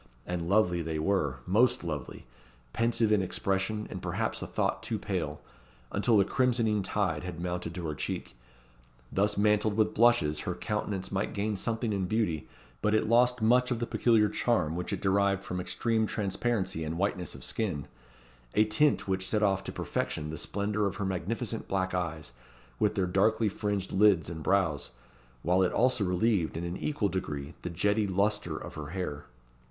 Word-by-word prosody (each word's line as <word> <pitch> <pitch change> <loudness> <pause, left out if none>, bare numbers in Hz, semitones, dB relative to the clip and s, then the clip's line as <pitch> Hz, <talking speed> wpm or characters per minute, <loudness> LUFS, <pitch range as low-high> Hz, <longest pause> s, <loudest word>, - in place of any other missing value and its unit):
And 90 -1 -3
lovely 90 -4 +3
they 80 -1 -3
were 75 -6 0
most 110 +6 +3
lovely! 75 -6 -5 0.5
pensive 115 -1 +2
in 105 -2 +4
expression, 95 +3 -1
and - - -5
perhaps - - -2
a - - -4
thought - - -1
too - - -2
pale, - - -3 0.5
until 110 +2 +3
the 100 - +5
crimsoning 115 -3 +2
tide 95 -5 -1
had 90 -2 -6
mounted 90 -1 -3
to 90 -2 -4
her 75 - -2
cheek. 70 - -4 0.8
Thus 105 +1 +1
mantled 105 0 +2
with 110 - +2
blushes, 105 -11 +4
her - - -3
countenance 105 -3 -3
might 100 +3 -2
gain 105 +1 -1
something 115 +2 -1
in 95 -2 0
beauty, 100 -8 0 0.3
but 105 0 +2
it 110 - +2
lost 120 +1 +4
much 125 +3 +4
of 120 - 0
the 120 - -2
peculiar 110 -1 +3
charm 105 -7 0
which 90 +1 -3
it - - -3
derived 100 0 +2
from 90 0 -3
extreme 110 +3 0
transparency 100 -4 -1
and 80 +1 -3
whiteness 95 -2 -1
of - - -10
skin 90 -10 -2 0.7
a 105 - +5
tint 130 +6 +2
which 95 -1 -1
set 105 -1 +1
off 95 -2 +2
to - - -4
perfection 75 0 -3
the 80 - -5
splendour 105 +3 -1
of 100 - -4
her 100 - -3
magnificent 110 +6 -3
black 95 -1 -1
eyes, 80 -7 -3 0.5
with 105 0 +2
their 95 -3 +1
darkly 105 +4 +2
fringed 100 -1 -2
lids 95 -5 +4
and 80 -1 -6
brows, 85 -5 +1 0.5
while 90 +3 +3
it 90 - +3
also 125 -2 +3
relieved, 90 -2 +1
in 85 - -3
an 85 +1 -3
equal 145 -9 0
degree, 75 -6 -4
the 90 - -4
jetty 100 +5 +1
lustre 100 +2 0
of - - -8
her 75 -1 -6
hair. 80 -4 -4
100 Hz, 180 wpm, -29 LUFS, 90-110 Hz, 0.8 s, the